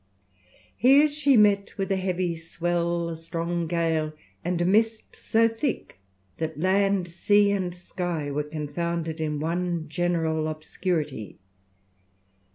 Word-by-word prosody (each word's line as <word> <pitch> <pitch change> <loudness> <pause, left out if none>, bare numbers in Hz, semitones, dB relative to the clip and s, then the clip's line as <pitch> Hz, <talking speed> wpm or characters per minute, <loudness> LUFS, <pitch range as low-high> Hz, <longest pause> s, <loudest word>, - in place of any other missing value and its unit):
Here 275 +6 +6
she 290 -3 +3
met 205 -2 +3
with 195 0 -2
a - - +3
heavy 185 -2 -1
swell, 170 +1 -1
a 165 - -4
strong 165 +1 -3
gale, 160 -2 0 0.3
and 175 0 -1
a 175 - +1
mist 220 +4 +1
so 225 +1 +2
thick 225 - -3 0.4
that 160 -1 -3
land, 195 +1 +2
sea, 205 +4 +3
and 185 -3 -1
sky 175 -4 -4
were 145 +1 0
confounded 160 +2 -3
in 150 -2 -1
one 170 +1 -2
general 160 -2 0
obscurity. 155 - -3
175 Hz, 125 wpm, -26 LUFS, 160-195 Hz, 0.4 s, Here